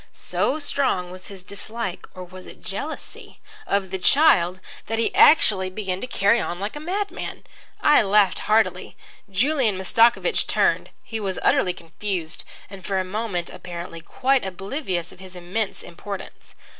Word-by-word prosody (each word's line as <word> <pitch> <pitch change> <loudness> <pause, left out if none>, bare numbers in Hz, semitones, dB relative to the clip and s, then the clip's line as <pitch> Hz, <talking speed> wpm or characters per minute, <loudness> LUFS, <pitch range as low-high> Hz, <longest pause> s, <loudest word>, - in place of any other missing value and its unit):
So 290 - -1
strong 270 -11 0
was 185 0 -9
his 195 -2 -8
dislike 200 0 -5
(or 185 - -7
was 185 +1 -11
it - - -13
jealousy?) 285 +11 -7 0.3
of 195 -2 0
the 190 - -2
child 185 - +4 0.3
that 225 - -1
he 230 - 0
actually 200 -11 +5
began 185 -1 -4
to - - -4
carry 220 -1 +3
on 175 - -4
like 205 +7 -4
a - - -5
madman. 390 +6 -4 0.4
I 295 - +6
laughed 205 -1 +3
heartily. 220 +1 +2 0.3
Julian 235 +1 +2
Mastakovich 230 - +3
turned. - - +2
He 225 - -5
was 195 -3 -3
utterly 180 - +3
confused 175 0 -5 0.2
and 195 -1 -11
for 195 +2 -1
a 185 - -1
moment, 190 -3 -3
apparently, 170 -1 -8
quite 265 +9 +1
oblivious 190 - -4
of - - -16
his 185 -1 -11
immense 190 +4 -3
importance. 190 +3 -9
195 Hz, 155 wpm, -23 LUFS, 185-230 Hz, 0.4 s, I